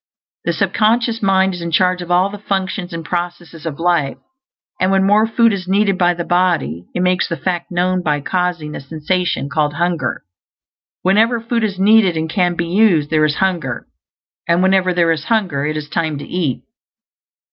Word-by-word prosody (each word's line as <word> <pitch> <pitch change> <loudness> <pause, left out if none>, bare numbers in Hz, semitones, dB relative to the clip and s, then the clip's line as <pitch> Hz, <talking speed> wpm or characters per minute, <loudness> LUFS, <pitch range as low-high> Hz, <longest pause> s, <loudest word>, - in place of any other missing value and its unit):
The - - +1
sub - - -1
conscious 225 +1 +1
mind 190 -1 +2
is 175 - -7
in 170 - -3
charge 180 +2 +2
of 175 - -8
all 180 +3 +2
the 205 - -8
functions 190 -2 -3
and 165 -1 -6
processes 175 -2 -5
of 150 -2 -5
life; 170 -5 +1 0.6
and 185 - +2
when 195 0 +3
more 210 +3 +4
food 230 0 +3
is 185 -2 -5
needed 195 +1 +2
by 175 -1 +3
the 170 - -3
body, 170 - 0
it 180 - 0
makes 180 0 +1
the 170 - -4
fact 175 -2 -3
known 180 +1 0
by 150 -3 0
causing 175 -2 -2
a - - -6
sensation 160 +2 -2
called 150 0 -1
hunger. 170 -7 -1 0.8
Whenever 225 +5 +3
food 230 0 -2
is 200 -3 -1
needed, 195 -3 +4
and 160 0 -1
can 180 -2 +1
be 170 - -2
used, 170 -5 +2
there 155 -1 +3
is 150 -1 0
hunger; 175 -8 -1 0.6
and 170 +2 +2
whenever 190 -1 +3
there 170 -2 +2
is 155 -2 -2
hunger 180 -11 0
it 155 0 -2
is 150 -1 -5
time 155 0 -2
to 145 - -7
eat. 160 -9 -2
180 Hz, 190 wpm, -17 LUFS, 160-190 Hz, 0.8 s, more